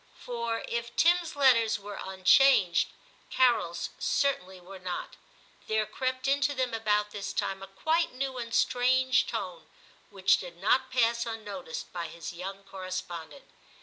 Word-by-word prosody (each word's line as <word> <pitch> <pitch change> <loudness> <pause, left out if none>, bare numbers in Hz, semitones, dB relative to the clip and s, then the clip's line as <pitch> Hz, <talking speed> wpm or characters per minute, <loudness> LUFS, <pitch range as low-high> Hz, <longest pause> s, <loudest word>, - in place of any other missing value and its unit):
For, 235 -1 -3
if 235 0 -4
Tim's 340 -1 +3
letters 240 -6 +4
were 205 0 -8
unchanged, 190 0 +4 0.4
Carol's 175 -10 +2
certainly 190 -10 0
were 185 +2 -11
not. 180 -1 -5 0.5
There 220 0 +1
crept 255 +4 -3
into 285 +1 +2
them 255 -2 -1
about 210 -2 +1
this 200 -1 -5
time 195 0 -2
a 195 - -8
quite 315 - 0
new 260 0 -3
and 230 -1 -5
strange 255 +2 +3
tone, 185 -7 -5 0.4
which 195 -2 +3
did 175 -2 -9
not 255 +8 +2
pass 235 -2 +1
unnoticed 205 -7 -6
by 170 -2 -3
his 170 +2 -8
young 195 +3 -7
correspondent. 185 - -7
220 Hz, 140 wpm, -29 LUFS, 190-255 Hz, 0.5 s, letters